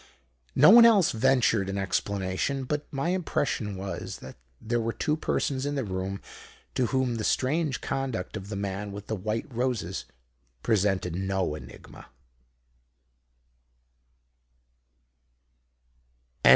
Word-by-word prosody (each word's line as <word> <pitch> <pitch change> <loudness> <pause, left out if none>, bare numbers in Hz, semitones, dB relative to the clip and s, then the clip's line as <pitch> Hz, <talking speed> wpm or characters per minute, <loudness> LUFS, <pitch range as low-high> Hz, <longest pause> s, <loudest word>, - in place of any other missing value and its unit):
No 150 +8 +8
one 235 +1 +10
else 215 -7 +6
ventured 115 -4 +2
an 100 - -2
explanation. 100 +6 -1
But 145 +3 -3
my 140 +4 -1
impression 145 - -1
was 95 +1 -5
that 65 - -10 0.2
there 120 +1 -1
were 115 0 -1
two 150 +8 0
persons 135 -3 -1
in 145 +1 -1
the 135 - -1
room 95 -1 -4 0.5
to 125 - +1
whom 130 -2 0
the 110 - -3
strange 145 +3 +1
conduct 135 -9 -3
of 100 -1 -6
the 105 - -4
man 100 +1 -3
with 100 +1 -7
the 110 - -2
white 110 +5 -2
roses 115 -7 -2 0.6
presented 95 -5 +1
no 95 -3 -1
enigma. 75 - -11
110 Hz, 120 wpm, -27 LUFS, 95-135 Hz, 0.6 s, one